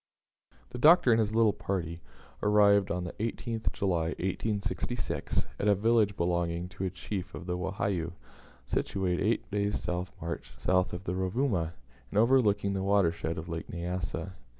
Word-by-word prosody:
The 125 - -6
Doctor 155 -2 +7
and 115 - +5
his 110 0 0
little 115 -2 +5
party 85 -4 -3 0.4
arrived 100 -1 +5
on 90 -3 -1
the 90 - -5
18th 115 0 -2
July, 85 -4 0
1866, 105 +4 -2
at 105 - 0
a 100 - +5
village 105 -1 +2
belonging 85 0 0
to 95 0 -4
a - - 0
chief 95 0 -5
of 90 - -8
the 90 -1 -2
Wahiyou, 90 -2 -2 0.5
situate 90 -2 -1
eight 110 0 0
days' 100 0 -1 0.3
march 85 +1 -5
south 90 0 +1
of 90 +1 -5
the 90 - -2
Rovuma, 95 - 0 0.4
and - - -3
overlooking 105 -4 +4
the 95 - -1
watershed 85 -4 +1
of 80 - -4
the 85 - -8
Lake 80 0 -4
Nyassa. 90 0 -4
95 Hz, 155 wpm, -30 LUFS, 90-105 Hz, 0.5 s, Doctor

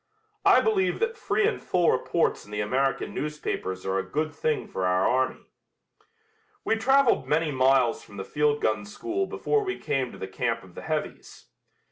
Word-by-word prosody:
I - - +7
believe 405 -4 +1
that 455 0 0
free 435 -1 +1
and 460 - -2
full 175 -2 +2
reports 165 +6 0
in - - -17
the 105 0 -4
American 130 +6 0
newspapers 145 -11 -4
are 95 0 0
a - - -2
good 155 +1 -1
thing 155 +1 -1
for 95 -1 -2
our 90 +1 +2
army." 130 +1 0 1.2
We 225 - +2
traveled 265 +2 +3
many 155 +1 +1
miles 130 -2 +3
from 100 - -13
the 95 - -5
field 150 0 +1
gun 110 -1 +1
school 360 - -3
before 435 -1 0
we 380 -1 -3
came 135 -3 -1
to - - -11
the 95 - -5
camp 115 +3 -2
of 95 -2 -16
the - - -8
heavies. 155 - -5
145 Hz, 180 wpm, -26 LUFS, -, 1.2 s, I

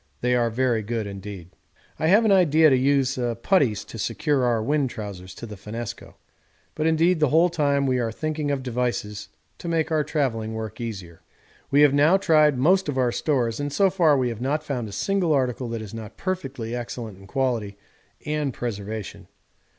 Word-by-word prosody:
They 125 0 +1
are 120 -1 +2
very 120 -1 +1
good 110 +1 -3
indeed. 100 -3 -8 0.5
I 160 - +1
have 210 +6 +5
an 215 - +4
idea 160 -5 +5
to - - +5
use 135 0 +2 0.2
putties 130 - +2
to 115 - -9
secure 130 +5 0
our 120 -3 +1
wind 140 +1 +1
trousers 100 -6 -8
to - - -8
the 105 -2 -8
finnesko. 105 +3 -7 0.6
But 155 +1 -1
indeed 165 +2 +3
the 150 -3 +3
whole 165 +5 +4
time 140 -4 +1
we 130 -1 +1
are 115 -2 -1
thinking 155 +3 -3
of 140 -2 -1
devices 120 -4 -3 0.3
to - - -7
make 165 -1 0
our 155 -1 +2
travelling 125 -7 -2
work 110 0 -6
easier. 95 -8 -7 0.5
'We 140 +1 +4
have 145 -2 +6
now 150 +6 +5
tried 155 -7 +4
most 180 +6 +3
of 140 - -2
our 125 -2 +2
stores, 120 -5 0
and 145 0 -2
so 195 +6 +3
far 165 -6 +4
we 125 -2 +1
have 115 -1 -6
not 145 +4 -1
found 125 -7 -3
a - - -10
single 175 - 0
article 125 -3 0
that 115 -1 -4
is 105 - -10
not 110 -1 -8
perfectly 135 -11 -4
excellent 115 -4 -6
in 100 - -14
quality 115 -4 -1 0.5
and 150 -4 -2
preservation. 105 -3 -5
130 Hz, 190 wpm, -24 LUFS, 110-150 Hz, 0.6 s, have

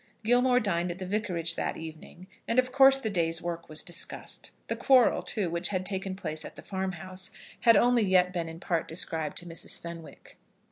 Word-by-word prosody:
Gilmore 245 +2 +4
dined 180 -5 0
at 175 - -4
the 185 - -5
Vicarage 180 -4 0
that - - -2
evening, 160 +2 -10 0.2
and 230 - -1
of 255 0 +3
course 270 +1 +7
the 270 - -4
day's 165 -3 +1
work 170 -1 -5
was 155 0 0
discussed. 175 - -2 0.2
The - - -2
quarrel, 255 -3 +4
too, 190 -6 -2
which 170 +1 0
had 185 -1 -2
taken 190 -1 -3
place 155 -5 -4
at - - -10
the - - -11
farmhouse 190 -1 -4 0.3
had 230 -3 +6
only 245 +2 +4
yet 185 -2 +3
been 170 -2 -2
in 165 0 -9
part 170 -3 -1
described 160 -2 -2
to 175 - -7
Mrs. 165 -1 -1
Fenwick. 170 -1 -10
185 Hz, 195 wpm, -28 LUFS, 170-215 Hz, 0.3 s, course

